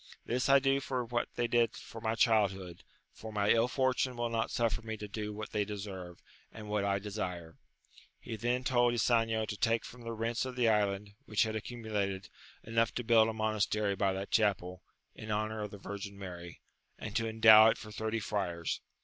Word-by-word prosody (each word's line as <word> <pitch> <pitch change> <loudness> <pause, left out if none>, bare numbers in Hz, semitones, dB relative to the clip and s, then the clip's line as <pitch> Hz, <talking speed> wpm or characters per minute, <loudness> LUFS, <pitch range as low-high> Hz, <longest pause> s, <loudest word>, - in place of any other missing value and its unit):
This 125 +3 0
I 140 - +8
do 135 0 +2
for 130 -2 -3
what 120 0 -2
they 120 - 0
did 120 0 +2
for 115 - -10
my 110 0 0
childhood, 100 -7 +1 0.3
for 110 - -9
my 105 -1 +2
ill 115 +1 +4
fortune 130 0 0
wiU 120 0 -2
not 115 -1 0
suffer 115 -2 0
me 110 0 -5
to 105 - -6
do 105 +1 -4
what 105 +1 -7
they 105 - +1
deserve, 95 -4 -7 0.3
and 110 -1 -9
what 105 -1 0
I 100 0 +1
desire. 90 -5 -5 0.6
He 115 - -6
then 120 +3 -1
told 120 -2 +3
Ysanjo 115 -1 +2
to 105 - -5
take 115 +1 +1
from 125 - -11
the 115 0 -5
rents 115 +1 -1
of 130 -1 -5
the 125 -2 +2
island, 105 -2 +1 0.2
which 105 - +2
had 110 -1 -2
accumulated, 105 -4 -3 0.3
enough 115 0 0
to 125 - -2
bmld 115 -1 +5
a - - -3
monastery 110 -1 0
by 95 0 +1
that 95 +1 -5
chapel, 90 -4 +1 0.3
in 110 - -9
honour 110 +1 -1
of 105 - -4
the 100 - -10
Virgin 100 0 -7
Mary, 90 -3 -9 0.4
and 105 0 -7
to 115 -2 +1
endow 110 0 +8
it - - 0
for 110 - -10
thirty 110 +1 -2
friars. 95 -5 -2
110 Hz, 200 wpm, -32 LUFS, 100-115 Hz, 0.6 s, I